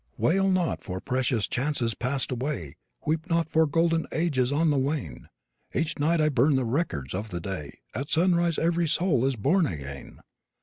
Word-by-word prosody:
Wail 190 Hz, -, +2 dB
not 185 Hz, -3 st, +1 dB
for 95 Hz, -1 st, -5 dB
precious 125 Hz, -1 st, 0 dB
chances 125 Hz, -3 st, -1 dB
passed 130 Hz, +5 st, -2 dB
away; 125 Hz, -, -3 dB, 0.3 s
Weep 160 Hz, +3 st, -1 dB
not 165 Hz, -2 st, +2 dB
for 160 Hz, 0 st, +4 dB
golden 165 Hz, +2 st, +1 dB
ages 140 Hz, -6 st, +1 dB
on 155 Hz, +2 st, +2 dB
the 145 Hz, -, +1 dB
wane; 130 Hz, -, -3 dB, 0.5 s
Each 160 Hz, -1 st, -1 dB
night 160 Hz, +3 st, +2 dB
I 155 Hz, -, +4 dB
burn 140 Hz, 0 st, +3 dB
the 130 Hz, -2 st, +1 dB
records 115 Hz, -, -2 dB
of 105 Hz, +4 st, -4 dB
the 85 Hz, -, -4 dB
day, 85 Hz, -5 st, -6 dB
At 135 Hz, +6 st, -4 dB
sunrise 170 Hz, -1 st, +2 dB
every 170 Hz, +1 st, +1 dB
soul 150 Hz, -6 st, +2 dB
is 135 Hz, -, 0 dB
born 155 Hz, -, +2 dB
again. 70 Hz, -, -7 dB
145 Hz, 175 wpm, -27 LUFS, 115-165 Hz, 0.5 s, for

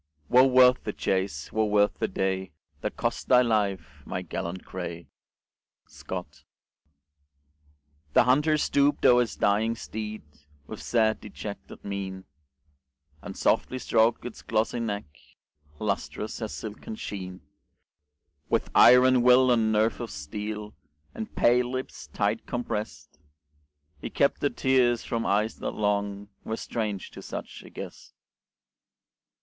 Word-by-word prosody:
"Wo 130 Hz, +2 st, +7 dB
worth 125 Hz, -1 st, +5 dB
the 105 Hz, -, -3 dB
chase. 95 Hz, -6 st, -2 dB
Wo 110 Hz, -, +2 dB
worth 105 Hz, -1 st, +2 dB
the -, -, +1 dB
day, 95 Hz, -2 st, -2 dB, 0.3 s
That -, -, -4 dB
cost -, -, -2 dB
thy 125 Hz, -1 st, +6 dB
life, 95 Hz, -, -1 dB
my -, -, -4 dB
gallant 90 Hz, +2 st, -5 dB
grey!" 85 Hz, -2 st, -6 dB, 0.8 s
Scott -, -, -8 dB, 1.7 s
The -, -, +6 dB
Hunter 150 Hz, +5 st, +3 dB
stooped 145 Hz, -1 st, +2 dB
o'er 125 Hz, 0 st, +7 dB
his 120 Hz, -, -2 dB
dying 110 Hz, +3 st, +1 dB
steed 110 Hz, -1 st, -6 dB, 0.4 s
With -, -, -8 dB
sad 110 Hz, -2 st, +1 dB
dejected 105 Hz, 0 st, -9 dB
mien, 95 Hz, -1 st, -5 dB, 1.0 s
And -, -, -8 dB
softly 130 Hz, -, +1 dB
stroked 115 Hz, -1 st, +2 dB
its 120 Hz, -, -7 dB
glossy 110 Hz, +2 st, 0 dB
neck, 105 Hz, -3 st, -3 dB, 0.7 s
Lustrous 105 Hz, +2 st, -3 dB
as 110 Hz, -, -3 dB
silken 110 Hz, -, -7 dB
sheen; 95 Hz, -, -7 dB, 1.1 s
With -, -, 0 dB
iron 125 Hz, 0 st, +7 dB
will 125 Hz, +1 st, +6 dB
and 115 Hz, -2 st, +3 dB
nerve 110 Hz, +1 st, +2 dB
of 120 Hz, -, -4 dB
steel, 105 Hz, +7 st, -6 dB, 0.4 s
And 110 Hz, -, -7 dB
pale 120 Hz, +1 st, +3 dB
lips 100 Hz, -, -5 dB
tight 105 Hz, +2 st, -1 dB
compressed, 105 Hz, -, -5 dB, 0.8 s
He -, -, -5 dB
kept 140 Hz, -, +1 dB
the 145 Hz, -, +2 dB
tears 125 Hz, -4 st, +2 dB
from 115 Hz, -1 st, -2 dB
eyes 105 Hz, +2 st, +1 dB
that -, -, -4 dB
long 100 Hz, -1 st, -1 dB
Were 110 Hz, -, -3 dB
strange 105 Hz, -4 st, -4 dB
to -, -, -10 dB
such -, -, -7 dB
a -, -, -13 dB
guest. -, -, -10 dB
110 Hz, 130 wpm, -27 LUFS, 100-120 Hz, 1.7 s, Wo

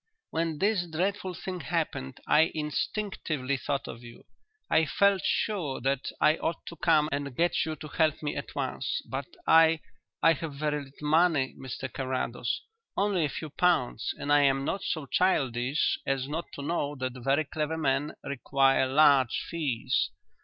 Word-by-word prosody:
"When 165 Hz, -1 st, -1 dB
this 195 Hz, -1 st, +1 dB
dreadful 185 Hz, +3 st, -2 dB
thing 185 Hz, +1 st, -5 dB
happened 155 Hz, -, -3 dB
I 160 Hz, +2 st, +5 dB
instinctively 150 Hz, -3 st, -2 dB
thought 140 Hz, +1 st, -2 dB
of 115 Hz, -, -8 dB
you. 120 Hz, -1 st, -13 dB, 0.4 s
I 160 Hz, -1 st, +3 dB
felt 200 Hz, +3 st, +3 dB
sure 175 Hz, -11 st, 0 dB
that 135 Hz, +1 st, 0 dB
I 155 Hz, +1 st, +4 dB
ought 165 Hz, -, -3 dB
to 170 Hz, -, -9 dB
come 155 Hz, -2 st, +3 dB
and 140 Hz, -2 st, -3 dB
get 170 Hz, +3 st, +2 dB
you 155 Hz, -, -2 dB
to 150 Hz, -, -9 dB
help 155 Hz, 0 st, +1 dB
me 145 Hz, -, -2 dB
at -, -, -6 dB
once. -, -, -2 dB
But -, -, -4 dB, 0.2 s
I 160 Hz, 0 st, +6 dB, 0.4 s
I 165 Hz, -, +7 dB
have 155 Hz, -1 st, -6 dB
very 150 Hz, +1 st, -1 dB
little 140 Hz, +2 st, -8 dB
money, 155 Hz, -3 st, +3 dB
Mr 130 Hz, 0 st, -6 dB
Carrados, 130 Hz, -3 st, -2 dB, 0.3 s
only 195 Hz, -5 st, +2 dB
a -, -, -1 dB
few 155 Hz, +2 st, -6 dB
pounds, 145 Hz, -10 st, +1 dB
and 145 Hz, -, 0 dB
I 145 Hz, -, +6 dB
am 135 Hz, -1 st, +3 dB
not 195 Hz, -, -1 dB
so 155 Hz, -4 st, -2 dB
childish 135 Hz, -5 st, +1 dB
as 135 Hz, -1 st, -1 dB
not 160 Hz, +4 st, -3 dB
to 140 Hz, -, -6 dB
know 145 Hz, -2 st, -1 dB
that 130 Hz, -2 st, -3 dB
very 140 Hz, +4 st, +2 dB
clever 155 Hz, +2 st, -2 dB
men 145 Hz, 0 st, 0 dB
require 135 Hz, 0 st, +2 dB
large 135 Hz, -2 st, +4 dB
fees. 145 Hz, -9 st, 0 dB
150 Hz, 165 wpm, -28 LUFS, 135-165 Hz, 0.4 s, I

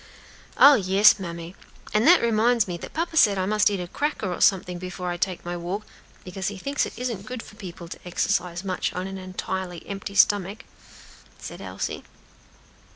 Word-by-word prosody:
"Oh, 285 Hz, -, +9 dB
yes, 200 Hz, -2 st, +5 dB
mammy! 170 Hz, -1 st, -7 dB, 0.4 s
and 215 Hz, +6 st, +3 dB
that 355 Hz, -4 st, +7 dB
reminds 230 Hz, 0 st, +3 dB
me 175 Hz, -, -3 dB
that -, -, -9 dB
papa 330 Hz, +1 st, -2 dB
said 205 Hz, -10 st, +5 dB
I 185 Hz, -, 0 dB
must 210 Hz, +1 st, +3 dB
eat 200 Hz, -2 st, -2 dB
a 180 Hz, -, -4 dB
cracker 220 Hz, -, -2 dB
or -, -, -6 dB
something 180 Hz, -2 st, +2 dB
before 180 Hz, 0 st, -5 dB
I 175 Hz, -, -3 dB
take 180 Hz, 0 st, -2 dB
my 175 Hz, 0 st, -3 dB
walk, 180 Hz, +5 st, -4 dB, 0.4 s
because 190 Hz, +1 st, -5 dB
he 205 Hz, -, -4 dB
thinks 280 Hz, +9 st, -1 dB
it -, -, -11 dB
isn't 235 Hz, -5 st, -4 dB
good 250 Hz, -1 st, -6 dB
for -, -, -14 dB
people 180 Hz, -5 st, -9 dB
to -, -, -9 dB
exercise 180 Hz, 0 st, -1 dB
much 185 Hz, -2 st, -2 dB
on 180 Hz, +1 st, -3 dB
an 195 Hz, 0 st, -6 dB
entirely 185 Hz, -1 st, -5 dB
empty 200 Hz, 0 st, -6 dB
stomach," 205 Hz, +1 st, +3 dB, 0.7 s
said -, -, -9 dB
Elsie. -, -, -5 dB
195 Hz, 185 wpm, -25 LUFS, 180-215 Hz, 0.7 s, Oh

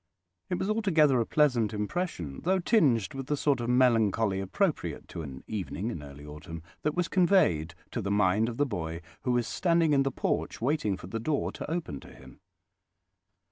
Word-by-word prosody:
It 180 Hz, -, 0 dB
was 190 Hz, -, -2 dB
altogether 165 Hz, -, +3 dB
a 115 Hz, -, -2 dB
pleasant 120 Hz, -8 st, +2 dB
impression, 105 Hz, -, -3 dB
though 190 Hz, +2 st, +2 dB
tinged 150 Hz, -, +2 dB
with 135 Hz, -1 st, -6 dB
the 145 Hz, -, 0 dB
sort 140 Hz, -2 st, +2 dB
of 120 Hz, -, -2 dB
melancholy 115 Hz, -5 st, +3 dB
appropriate 95 Hz, -, -1 dB
to -, -, -6 dB
an 65 Hz, -4 st, -8 dB
evening 100 Hz, -, -3 dB
in 85 Hz, -, -6 dB
early 70 Hz, 0 st, -11 dB
autumn, 75 Hz, +2 st, -9 dB, 0.2 s
that 150 Hz, 0 st, -1 dB
was 180 Hz, -1 st, +1 dB
conveyed 155 Hz, -, +3 dB, 0.2 s
to 120 Hz, -, -2 dB
the 100 Hz, -, -3 dB
mind 105 Hz, +2 st, +3 dB
of 120 Hz, -, -6 dB
the 145 Hz, -, +3 dB
boy 85 Hz, -, -4 dB, 0.2 s
who 125 Hz, -, 0 dB
was 120 Hz, -1 st, +1 dB
standing 165 Hz, -3 st, +2 dB
in 140 Hz, -, +4 dB
the 135 Hz, -, +1 dB
porch -, -, -2 dB
waiting 120 Hz, -6 st, 0 dB
for -, -, -10 dB
the 115 Hz, +5 st, -4 dB
door 145 Hz, +6 st, -1 dB
to -, -, -7 dB
open 160 Hz, -, -3 dB
to -, -, -14 dB
him. -, -, -15 dB
120 Hz, 190 wpm, -29 LUFS, 95-155 Hz, 0.2 s, in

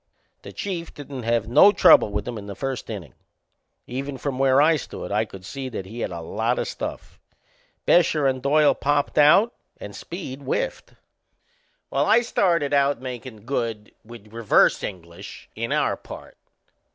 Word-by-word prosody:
The -, -, -10 dB
Chief 175 Hz, -4 st, -5 dB
didn't 140 Hz, -3 st, -8 dB
have 115 Hz, -1 st, 0 dB
no 150 Hz, -, +7 dB
trouble 155 Hz, -, +6 dB
with 105 Hz, +2 st, -3 dB
'em 120 Hz, -3 st, -4 dB
in 100 Hz, -, -10 dB
the 100 Hz, -, -7 dB
first 135 Hz, -2 st, -4 dB
innin'. -, -, -7 dB, 0.7 s
Even 135 Hz, +2 st, -5 dB
from 130 Hz, 0 st, -4 dB
where 135 Hz, 0 st, +4 dB
I 160 Hz, +3 st, +5 dB
stood 145 Hz, -, -7 dB
I -, -, +1 dB
could 95 Hz, -1 st, -12 dB
see 135 Hz, +4 st, -6 dB
that 105 Hz, -6 st, -6 dB
he 110 Hz, +5 st, -9 dB
had -, -, -2 dB
a 85 Hz, -2 st, -6 dB
lot 110 Hz, +8 st, -1 dB
o' -, -, 0 dB
stuff. -, -, -7 dB, 0.7 s
Bescher 155 Hz, -4 st, +3 dB
and 130 Hz, -1 st, -1 dB
Doyle 145 Hz, +2 st, +4 dB
popped 145 Hz, +1 st, 0 dB
out 195 Hz, +11 st, +5 dB, 0.3 s
and 100 Hz, -1 st, -9 dB
Speed 145 Hz, -, -7 dB
whiffed. 135 Hz, -, -3 dB, 1.0 s
Well, 140 Hz, +2 st, +1 dB
I 230 Hz, -, +5 dB
started 170 Hz, -10 st, +1 dB
out 140 Hz, 0 st, +2 dB
makin' 125 Hz, -3 st, -8 dB
good, 115 Hz, -5 st, -3 dB
with 110 Hz, -2 st, -14 dB
reverse 115 Hz, -2 st, +3 dB
English, 85 Hz, -3 st, -9 dB
in -, -, -4 dB
our -, -, +1 dB
part. -, -, -12 dB
130 Hz, 165 wpm, -23 LUFS, 110-145 Hz, 1.0 s, no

